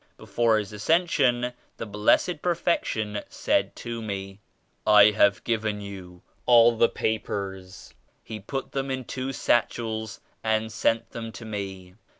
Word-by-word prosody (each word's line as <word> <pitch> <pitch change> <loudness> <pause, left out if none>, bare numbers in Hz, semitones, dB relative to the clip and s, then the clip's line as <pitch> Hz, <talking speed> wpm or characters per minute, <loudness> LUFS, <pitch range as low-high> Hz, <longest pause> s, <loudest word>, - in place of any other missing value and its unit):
Before 115 -2 +1
His 105 0 -4
As 105 - -8
cension, 130 -7 +2 0.2
the - - -5
Blessed 110 - +2
Perfection 115 - -1
said - - 0
to 115 -1 -6
me 95 -2 -5 0.5
*I 105 0 +8
have 100 -1 +3
given 110 -3 -1
you 95 -3 -10 0.2
all 120 -1 +7
the 115 +1 +4
papers.' 95 -4 -4 0.3
He 110 - -7
put 135 +3 -5
them 135 0 -2
in 130 -1 -3
two 130 +2 -4
satchels 110 -3 -1 0.2
and 110 0 0
sent 115 +1 0
them 115 -1 -6
to 115 - -9
me. 95 -4 -6
110 Hz, 140 wpm, -26 LUFS, 105-120 Hz, 0.5 s, I